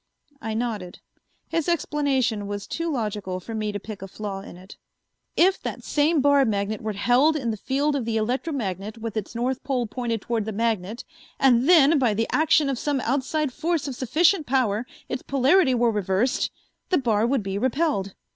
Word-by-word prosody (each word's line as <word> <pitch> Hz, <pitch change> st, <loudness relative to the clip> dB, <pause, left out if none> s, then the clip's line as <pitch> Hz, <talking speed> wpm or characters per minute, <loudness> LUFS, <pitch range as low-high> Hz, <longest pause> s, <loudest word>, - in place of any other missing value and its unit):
I 220 Hz, -4 st, -3 dB
nodded. 220 Hz, -6 st, -3 dB, 0.5 s
His 330 Hz, 0 st, -1 dB
explanation 265 Hz, -10 st, 0 dB
was 205 Hz, 0 st, -4 dB
too 335 Hz, 0 st, -3 dB
logical 210 Hz, -7 st, -3 dB
for 225 Hz, +5 st, -8 dB
me 215 Hz, -1 st, -2 dB
to 205 Hz, -, -4 dB
pick 210 Hz, -1 st, -9 dB
a 195 Hz, -, -6 dB
flaw 200 Hz, 0 st, -5 dB
in 185 Hz, -, -11 dB
it. 185 Hz, +2 st, -13 dB, 0.6 s
"If 375 Hz, +3 st, +4 dB
that -, -, -5 dB
same 300 Hz, +1 st, +2 dB
bar 285 Hz, 0 st, +5 dB
magnet 210 Hz, -2 st, -1 dB
were 215 Hz, -1 st, -3 dB
held 245 Hz, +10 st, +3 dB
in 245 Hz, -6 st, -1 dB
the -, -, -3 dB
field 280 Hz, +7 st, 0 dB
of 265 Hz, -5 st, -2 dB
the 225 Hz, -1 st, -1 dB
electromagnet 220 Hz, -, -2 dB
with 225 Hz, -1 st, -5 dB
its 215 Hz, +1 st, -4 dB
north 250 Hz, +2 st, -1 dB
pole 260 Hz, -3 st, -1 dB
pointed 230 Hz, -1 st, -3 dB
toward 225 Hz, -1 st, -2 dB
the 220 Hz, -, -3 dB
magnet 225 Hz, +2 st, -1 dB, 0.4 s
and 260 Hz, +1 st, +4 dB
then, 315 Hz, -3 st, +6 dB
by 235 Hz, -5 st, +2 dB
the 225 Hz, +2 st, +1 dB
action 310 Hz, -1 st, +3 dB
of 270 Hz, -3 st, -1 dB
some 290 Hz, -2 st, 0 dB
outside 280 Hz, +1 st, -1 dB
force 325 Hz, 0 st, -1 dB
of 275 Hz, -, -3 dB
sufficient 315 Hz, -, +2 dB
power, 245 Hz, -3 st, +1 dB, 0.2 s
its 255 Hz, -, -4 dB
polarity 275 Hz, +2 st, +3 dB
were 235 Hz, -1 st, +3 dB
reversed, 205 Hz, +4 st, 0 dB, 0.4 s
the 365 Hz, -, +3 dB
bar 225 Hz, -4 st, +2 dB
would 260 Hz, -3 st, 0 dB
be 195 Hz, 0 st, -3 dB
repelled. 260 Hz, -, 0 dB
240 Hz, 185 wpm, -24 LUFS, 210-285 Hz, 0.6 s, then